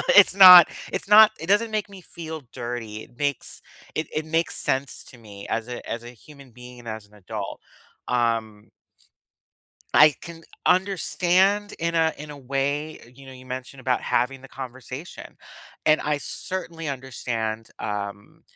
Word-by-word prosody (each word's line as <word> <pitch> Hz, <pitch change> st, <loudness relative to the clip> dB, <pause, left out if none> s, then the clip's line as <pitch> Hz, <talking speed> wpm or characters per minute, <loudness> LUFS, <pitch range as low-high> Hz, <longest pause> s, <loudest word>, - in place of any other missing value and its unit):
It's 205 Hz, -2 st, +8 dB
not 180 Hz, -3 st, +11 dB, 0.3 s
it's -, -, -4 dB
not 215 Hz, +1 st, +8 dB
it 165 Hz, -, -7 dB
doesn't 210 Hz, +4 st, +3 dB
make 210 Hz, -1 st, -2 dB
me 195 Hz, -1 st, -12 dB
feel 160 Hz, -3 st, -8 dB
dirty, 115 Hz, -3 st, -6 dB
it 120 Hz, -, -19 dB
makes 145 Hz, -3 st, -3 dB, 0.3 s
it 155 Hz, -1 st, -2 dB
it 155 Hz, -, -2 dB
makes 165 Hz, +1 st, -1 dB
sense 135 Hz, 0 st, -2 dB
to 125 Hz, -, -14 dB
me 100 Hz, -3 st, -12 dB
as 115 Hz, +1 st, -2 dB
a 120 Hz, -, -6 dB
as 115 Hz, 0 st, -4 dB
a 120 Hz, -, -8 dB
human 140 Hz, +1 st, -16 dB
being 125 Hz, +1 st, -13 dB
and 120 Hz, -, -13 dB
as 110 Hz, -1 st, -7 dB
an 105 Hz, -, -27 dB
adult, 100 Hz, 0 st, -7 dB, 0.5 s
um 115 Hz, -3 st, -1 dB, 1.2 s
I 150 Hz, -1 st, +7 dB
can 165 Hz, -1 st, -10 dB, 0.2 s
understand 190 Hz, +1 st, +2 dB
in 170 Hz, 0 st, -2 dB
a 160 Hz, -1 st, +2 dB
in 150 Hz, +1 st, -9 dB
a 145 Hz, -, -9 dB
way, 140 Hz, 0 st, -3 dB
you 135 Hz, +1 st, -15 dB
know, 130 Hz, -, -10 dB
you 130 Hz, 0 st, -13 dB
mentioned 130 Hz, +1 st, -7 dB
about 125 Hz, 0 st, 0 dB
having 135 Hz, +1 st, -1 dB
the 135 Hz, -, -13 dB
conversation, 130 Hz, +4 st, -9 dB, 0.5 s
and 155 Hz, 0 st, +4 dB
I 150 Hz, 0 st, 0 dB
certainly 165 Hz, 0 st, -5 dB
understand, 115 Hz, -4 st, -4 dB
um, 100 Hz, -1 st, -6 dB
135 Hz, 160 wpm, -24 LUFS, 120-165 Hz, 1.2 s, not